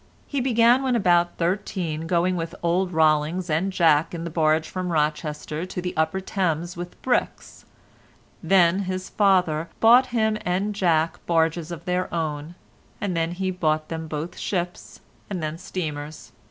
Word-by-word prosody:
He 280 -2 -2
began 240 0 +4
when 260 -2 +1
about 175 -5 +2
thirteen 170 -3 -2
going 180 +1 +1
with 165 -1 -4
old 180 +2 +1
Rollings 160 +2 +2
and 175 +6 +1
Jack 165 -3 +3
in 165 - -5
the 170 - -5
barge 155 -1 +2
from 185 -1 -4
Rochester 150 0 -1
to 185 - -5
the 180 0 -4
upper 160 +3 0
Thames 175 -3 -2
with 175 0 -8
bricks; 255 - -2 0.8
then 185 -1 +4
his 185 0 -4
father 180 -6 +2
bought 245 +3 +6
him 220 -3 0
and 190 +4 -1
Jack 165 -5 +1
barges 165 -1 +1
of 170 -1 -7
their 180 0 -1
own, 155 0 -3 0.4
and 195 -4 -2
then 165 +1 0
he 185 +1 -2
bought 155 -4 -1
them 160 -1 -5
both 155 +2 -5
ships, 175 -2 -4 0.3
and 185 -5 -4
then 155 +2 -4
steamers. 150 -7 -6
175 Hz, 155 wpm, -24 LUFS, 160-185 Hz, 0.8 s, bought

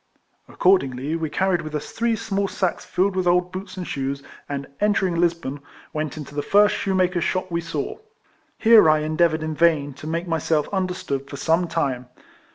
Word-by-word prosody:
Accordingly, 145 -5 +1
we 165 -2 -2
carried 185 +1 +1
with 155 -1 -6
us 150 0 -4
three 230 0 0
small 200 -2 -1
sacks 185 -2 -2
filled 185 +1 0
with 185 -1 0
old 180 +1 +2
boots 185 0 -7
and 180 - -4
shoes, 140 -1 -3 0.3
and 140 -1 -3
entering 205 -3 +2
Lisbon, 165 -5 0 0.3
went 155 -1 -3
into 145 -2 -8
the 145 - -1
first 205 +5 +4
shoemaker's 185 -2 +1
shop 185 -1 -1
we 170 0 0
saw. 160 -4 -4 0.6
Here 220 -7 +7
I 155 0 +3
endea 155 +2 +3
voured 155 0 -3
in 155 0 -2
vain 155 -3 +2
to 145 +3 -10
make 165 +2 -2
myself 160 -2 0
understood 180 -8 -2
for 140 - -7
some 165 +4 +1
time. 135 -7 -2
170 Hz, 180 wpm, -23 LUFS, 150-185 Hz, 0.6 s, Here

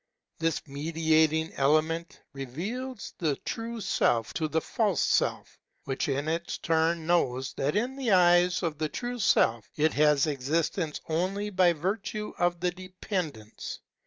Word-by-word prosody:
This 165 -1 -1
mediating 160 +2 +1
element 155 +4 +1
reveals 200 - -5
the 155 -5 +1
true 230 0 -4
Self 115 - +1
to 160 - -1
the 160 +1 +1
false 200 - 0
Self, - - 0 0.2
which 135 +1 -2
in 140 +2 -1
its 165 +2 -2
turn 165 0 +1
knows 130 -7 +1
that 145 +6 -1
in 245 +5 0
the 265 -3 -2
eyes 180 -1 +5
of 155 -3 -2
the 155 -1 -1
true 245 - -4
Self 115 - +2
it 155 +1 +2
has 150 -1 +4
existence 155 +3 -1
only 190 +6 -1
by 180 -2 +4
virtue 200 +5 -3
of 175 0 +1
the 180 0 +1
dependence. 180 - -5
165 Hz, 140 wpm, -28 LUFS, 150-185 Hz, 0.2 s, eyes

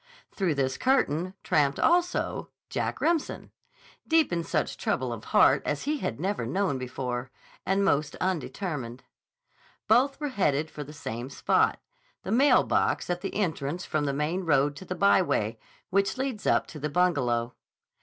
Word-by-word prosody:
Through 185 -6 0
this 130 -1 -1
curtain 185 - +1
tramped 145 -5 +2
also 355 +1 +1 0.2
Jack - - -2
Remsen, 335 -3 -1 0.6
deep 320 - +3
in 170 -1 0
such - - -1
trouble - - -1
of - - -8
heart - - +5
as - - -2
he 300 +1 -1
had 115 - -3
never 195 +5 -1
known 190 -8 0
before, 125 0 -4 0.4
and 195 +1 +2
most 150 -4 +1
undetermined. 145 - -3 0.8
Both 255 +6 +3
were 295 -1 -2
headed 160 - 0
for 150 - -6
the 145 - -11
same 125 -4 -6
spot, 135 - +1 0.4
the 190 - -4
mailbox 260 -6 +3
at 175 0 -2
the 195 - -5
entrance 170 -4 -2
from 155 -2 -1
the 140 - 0
main 155 +6 -1
road 145 -3 +2
to 190 - -9
the 185 - -4
byway 170 - +2 0.3
which 195 +5 +1
leads 260 -5 -3
up - - +3
to 155 - -8
the 150 +1 -2
Bungalow. 130 -8 +1
170 Hz, 155 wpm, -27 LUFS, 140-200 Hz, 0.8 s, heart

